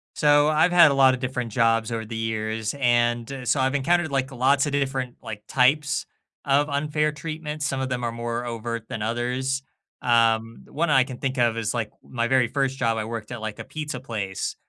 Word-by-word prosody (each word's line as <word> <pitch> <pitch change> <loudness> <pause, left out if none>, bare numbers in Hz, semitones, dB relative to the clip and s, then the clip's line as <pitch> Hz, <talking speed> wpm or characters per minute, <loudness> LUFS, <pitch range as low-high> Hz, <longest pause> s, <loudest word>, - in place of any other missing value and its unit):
So, 145 0 +4
I've 160 +3 +3
had 170 -4 +7
a - - +2
lotta 130 -2 +5
different 125 -2 -3
jobs 115 0 +2
over 110 -1 -3
the 115 +1 -7
years, 110 0 -2
and 120 +1 +1
so, 135 - +2
I've 135 +2 +1
encountered, 165 +3 +1
like, 135 0 -1
lots 135 +3 +2
a 145 - -2
different, 135 -3 -1
like, 110 -1 -7
types 140 +2 +2 0.4
of 145 +1 +3
unfair 150 +1 0
treatments. 155 -1 -5
Some 135 -2 -1
of 130 0 -2
them 125 -1 -2
are 115 - -1
more 120 +1 -4
overt 115 -1 -4
than 110 - -5
others. 125 +4 -1 0.4
Um, 115 -1 +2
the - - -20
one 170 +3 0
that 150 - +4
I 130 - +6
can 130 -1 -8
think 135 0 -2
of 120 -2 +2
is, 110 -2 -1
like, 115 -3 -2
my 115 -2 -2
very 130 -1 +3
1st 135 +1 -1
job, 115 -3 +1
I 110 - -2
worked 115 0 -6
at 120 - -5 0.2
a - - -5
pizza 150 -4 -5
place. 105 -7 -4
125 Hz, 210 wpm, -24 LUFS, 115-140 Hz, 0.4 s, had